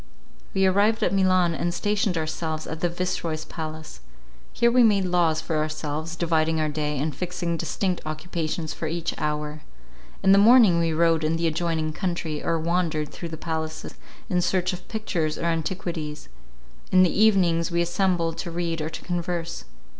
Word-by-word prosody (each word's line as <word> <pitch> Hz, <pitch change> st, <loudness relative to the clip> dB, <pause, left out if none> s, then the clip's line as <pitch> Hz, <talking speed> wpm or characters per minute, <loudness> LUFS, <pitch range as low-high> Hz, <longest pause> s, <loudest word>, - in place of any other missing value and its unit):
We 190 Hz, 0 st, +3 dB
arrived 205 Hz, +4 st, +3 dB
at -, -, +1 dB
Milan, 185 Hz, -3 st, +3 dB
and 175 Hz, +2 st, -1 dB
stationed 205 Hz, -1 st, 0 dB
ourselves 155 Hz, 0 st, -3 dB
in 160 Hz, -, -6 dB
the 175 Hz, -, +1 dB
Vice 180 Hz, +1 st, -2 dB
Roy's 160 Hz, -1 st, -3 dB
palace. 155 Hz, -, -7 dB, 0.5 s
Here 235 Hz, 0 st, +3 dB
we 250 Hz, +1 st, +5 dB
made 205 Hz, -5 st, +4 dB
laws 175 Hz, -3 st, +2 dB
for 160 Hz, -, -2 dB
ourselves, 155 Hz, +1 st, -3 dB
dividing 160 Hz, -1 st, +1 dB
our 155 Hz, -1 st, +1 dB
day, 150 Hz, -1 st, -2 dB
and 145 Hz, +1 st, -2 dB
fixing 175 Hz, 0 st, -2 dB
distinct 180 Hz, +2 st, -2 dB
occupations 155 Hz, 0 st, -3 dB
for 160 Hz, -, -4 dB
each 170 Hz, +1 st, -2 dB
hour. 150 Hz, 0 st, -2 dB, 0.6 s
In 195 Hz, -, +5 dB
the 195 Hz, -, +7 dB
morning 215 Hz, -5 st, +7 dB
we 165 Hz, -1 st, +1 dB
rode 165 Hz, 0 st, +2 dB
in 155 Hz, +1 st, +1 dB
the 165 Hz, +1 st, -1 dB
adjoining 160 Hz, -1 st, -1 dB
country, 170 Hz, -4 st, -3 dB
or 165 Hz, -, +1 dB
wandered 165 Hz, -2 st, 0 dB
through 170 Hz, -, -7 dB
the 160 Hz, -, -6 dB
palaces, 160 Hz, -1 st, -4 dB, 0.3 s
in 180 Hz, -5 st, +1 dB
search 185 Hz, +1 st, +1 dB
of 180 Hz, -, -8 dB
pictures 175 Hz, -8 st, -2 dB
or -, -, -5 dB
antiquities. 165 Hz, -2 st, -3 dB, 0.6 s
In 185 Hz, 0 st, +6 dB
the 180 Hz, -, +1 dB
evening 190 Hz, -6 st, +4 dB
we 170 Hz, 0 st, +2 dB
assembled 170 Hz, -2 st, 0 dB
to 175 Hz, -, -4 dB
read 170 Hz, -1 st, -2 dB
or 155 Hz, -, -2 dB
to -, -, -8 dB
converse. 175 Hz, -1 st, -3 dB
170 Hz, 175 wpm, -25 LUFS, 155-180 Hz, 0.6 s, the